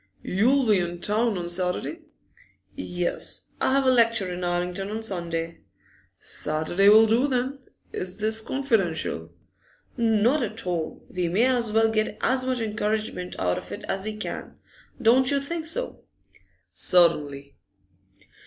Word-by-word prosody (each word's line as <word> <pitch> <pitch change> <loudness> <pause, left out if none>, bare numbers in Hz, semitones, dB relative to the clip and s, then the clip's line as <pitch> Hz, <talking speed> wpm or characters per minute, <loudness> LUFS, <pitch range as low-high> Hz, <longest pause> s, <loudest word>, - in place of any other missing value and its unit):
'You'll 250 +8 +2
be 210 -3 +4
in 175 0 -3
town 215 +3 0
on 175 -1 -4
Saturday?' 180 - -2 0.8
'Yes; 175 0 -3
I - - +2
have 275 0 +2
a 260 - +5
lecture 230 -6 +2
in 180 0 -5
Islington 180 +2 -2
on 220 +1 -4
Sunday.' 170 -5 -3 0.6
'Saturday 160 +6 +1
will 220 +2 +8
do, 230 +5 +3
then. 260 +1 -1 0.3
Is 180 +1 -5
this 220 +1 +1
confidential?' 195 - -1 0.7
'Not 230 +5 +3
at 220 -3 -4
all. 170 -3 -3
We 180 -1 -2
may 195 +8 +2
as 245 -4 +1
well 225 +1 +4
get 215 -1 -1
as 260 0 +1
much 255 -2 0
encouragement 215 -3 -2
out 90 -1 0
of - - -13
it 205 - -6
as 190 - -2
we 215 0 -4
can. 215 - -6 0.4
Don't 255 +2 +4
you 280 - +2
think 320 +3 -4
so?' - - -4 0.7
'Certainly. 145 -6 +2
215 Hz, 145 wpm, -25 LUFS, 180-240 Hz, 0.8 s, will